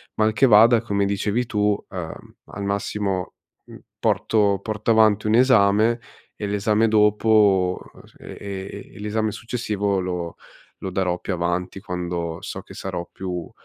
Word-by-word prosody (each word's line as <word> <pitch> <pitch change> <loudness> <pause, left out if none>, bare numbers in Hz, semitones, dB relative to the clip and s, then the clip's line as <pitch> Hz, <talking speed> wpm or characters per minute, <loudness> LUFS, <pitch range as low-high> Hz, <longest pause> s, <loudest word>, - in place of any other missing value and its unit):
mal 110 0 +2
che 135 - +4
vada, 115 0 +6
come 100 -3 0
dicevi 105 +4 -1
tu, 105 -2 0
uhm, 90 -4 -8
al 100 - -7
massimo, 100 -2 -2 0.3
mhmm, - - -13 0.2
porto 100 -3 +2
porto 110 +1 -1
avanti 110 -2 +4
un 110 - +3
esame 115 -2 +4 0.3
e 105 - -4
l'esame 105 +2 +1
dopo 105 -3 +3
uhm, - - -16
s - - -22
e - - -10
e 100 0 -7
e - - -11
l'esame 110 +1 -1
successivo 105 -4 -2
lo 90 -2 -4 0.5
lo 95 - -4
darò 90 -1 0
più - - -5
avanti 90 +2 -2
quando 90 -3 -4
so - - -6
che - - -14
sarò 85 - -5
più 90 -3 -5
100 Hz, 155 wpm, -23 LUFS, 95-110 Hz, 0.5 s, vada